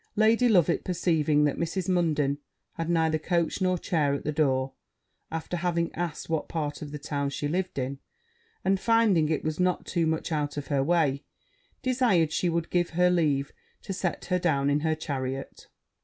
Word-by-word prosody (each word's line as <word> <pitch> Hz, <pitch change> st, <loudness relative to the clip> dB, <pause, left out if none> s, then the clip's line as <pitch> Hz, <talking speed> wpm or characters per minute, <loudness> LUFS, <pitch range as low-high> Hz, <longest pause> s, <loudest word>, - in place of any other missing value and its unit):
Lady 225 Hz, +3 st, +4 dB
Loveit 180 Hz, -8 st, +3 dB
perceiving 160 Hz, -4 st, +2 dB
that 145 Hz, -2 st, +1 dB
Mrs. 170 Hz, +2 st, -2 dB
Munden 155 Hz, -6 st, +1 dB, 0.3 s
had 165 Hz, 0 st, -4 dB
neither 160 Hz, -2 st, +2 dB
coach 170 Hz, +3 st, 0 dB
nor 185 Hz, -1 st, +2 dB
chair 150 Hz, -6 st, 0 dB
at -, -, -5 dB
the 150 Hz, -, -1 dB
door, 135 Hz, -3 st, +1 dB, 0.6 s
after 165 Hz, +2 st, -4 dB
having 170 Hz, -1 st, -1 dB
asked 170 Hz, -2 st, -4 dB
what 160 Hz, -2 st, -2 dB
part 150 Hz, -3 st, -3 dB
of 150 Hz, 0 st, -6 dB
town 140 Hz, -2 st, -1 dB
she 145 Hz, +1 st, -3 dB
lived 180 Hz, +3 st, -2 dB
in, 135 Hz, +1 st, -3 dB, 0.7 s
and 195 Hz, 0 st, +3 dB
finding 210 Hz, -9 st, +3 dB
it 160 Hz, -, 0 dB
was 155 Hz, +1 st, -2 dB
not 180 Hz, 0 st, +1 dB
too 170 Hz, -3 st, 0 dB
much 160 Hz, +1 st, -1 dB
out 150 Hz, -2 st, -1 dB
of 145 Hz, -, -5 dB
her 140 Hz, -2 st, +2 dB
way, 150 Hz, -3 st, +1 dB, 0.6 s
desired 240 Hz, -, +2 dB
she 175 Hz, +3 st, +1 dB
would 170 Hz, 0 st, -2 dB
give 175 Hz, -1 st, +1 dB
her 180 Hz, 0 st, +5 dB
leave 145 Hz, -6 st, +1 dB, 0.3 s
to 195 Hz, -, -4 dB
set 185 Hz, -1 st, -3 dB
her 180 Hz, 0 st, +1 dB
down 145 Hz, -5 st, +1 dB
in 145 Hz, -, +2 dB
her 160 Hz, +1 st, 0 dB
chariot. 135 Hz, -4 st, -5 dB
160 Hz, 180 wpm, -27 LUFS, 145-180 Hz, 0.7 s, her